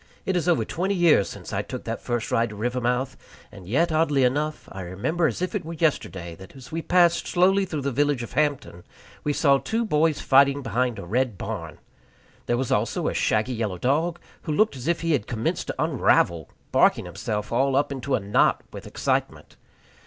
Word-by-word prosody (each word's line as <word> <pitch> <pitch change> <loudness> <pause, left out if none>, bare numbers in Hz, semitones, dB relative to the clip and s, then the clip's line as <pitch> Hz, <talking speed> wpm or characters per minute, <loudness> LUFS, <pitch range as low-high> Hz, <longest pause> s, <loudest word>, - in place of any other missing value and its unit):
It 190 - 0
is 175 -1 0
over 170 - +2
twenty 190 +4 -1
years 170 - +4
since - - -9
I - - 0
took - - -7
that - - -4
first 120 -2 -3
ride 115 0 +2
to 105 - -9
Rivermouth, 125 +3 -1 0.4
and 95 -3 -12
yet, 160 - +1
oddly 155 -4 +2
enough, 150 +5 -1
I 95 - -7
remember 105 - -1
as 140 +7 -3
if 185 - -2
it - - -2
were 165 +2 -6
yesterday, 95 - -1
that, 95 +6 -13
as 130 -2 -12
we 165 +1 -2
passed 175 0 +3
slowly 190 +2 +3
through 155 -6 -4
the 140 - -1
village 145 -1 +1
of 115 - -8
Hampton, 140 - -1 0.4
we 150 - 0
saw 140 -2 +3
two 230 +8 -1
boys 155 -5 +2
fighting 140 +1 +4
behind 125 -2 -1
a - - -7
red 120 +2 0
barn. - - -6 0.7
There 120 - +1
was 130 0 -2
also - - 0
a - - -4
shaggy 110 +4 +1
yellow 110 -6 -2
dog, 155 - 0 0.2
who 160 - -4
looked 215 +1 +2
as 130 +2 -7
if 170 0 +1
he 165 0 0
had 130 -9 0
commenced 115 -1 -2
to - - -3
unravel, 85 -3 +2 0.2
barking - - +3
himself 105 -1 -4
all 135 +3 +2
up 140 +1 +1
into 135 0 -1
a - - 0
knot 100 0 +2
with - - -8
excitement. - - -2
135 Hz, 205 wpm, -24 LUFS, 115-160 Hz, 0.7 s, years